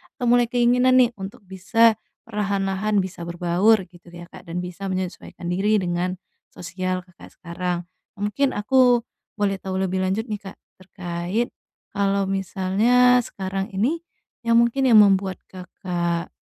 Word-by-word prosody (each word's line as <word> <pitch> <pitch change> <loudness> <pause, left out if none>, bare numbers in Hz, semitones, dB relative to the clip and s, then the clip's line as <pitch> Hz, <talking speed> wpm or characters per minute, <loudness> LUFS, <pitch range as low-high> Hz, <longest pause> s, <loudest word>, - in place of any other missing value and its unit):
atau 245 - -4
mulai 245 -1 +4
keinginan 250 +1 +3
nih 250 -2 +5
untuk 200 +4 -8
bisa 220 +4 +2 0.2
perlahan-lahan 200 -1 -1
bisa 175 -2 -7
berbaur 180 +5 +2
gitu 175 0 -19
ya, 175 0 -10
Kak. - - -13
Dan 170 - -4
bisa 180 +2 -6
menyesuaikan 185 -1 -5
diri 200 +4 +2
dengan 175 +1 -1 0.3
sosial 185 +1 -4
Kakak 180 0 -16
sekarang. 175 0 -4 0.3
Mungkin 210 +7 0
aku 245 +2 +4 0.3
boleh 195 -2 0
tahu 190 -1 -4
lebih 185 0 -2
lanjut 190 +4 0
nih, 210 - -3
Kak, - - -13 0.3
terkait 180 +4 -3 0.4
kalau 200 -1 +1
misalnya 195 +6 +3
sekarang 195 -3 -4
ini 260 +12 +1 0.5
yang 230 - +4
mungkin 235 +3 +3
yang 225 -3 +7
membuat 195 -1 +2 0.2
Kakak 175 -2 -4
195 Hz, 140 wpm, -23 LUFS, 180-225 Hz, 0.5 s, yang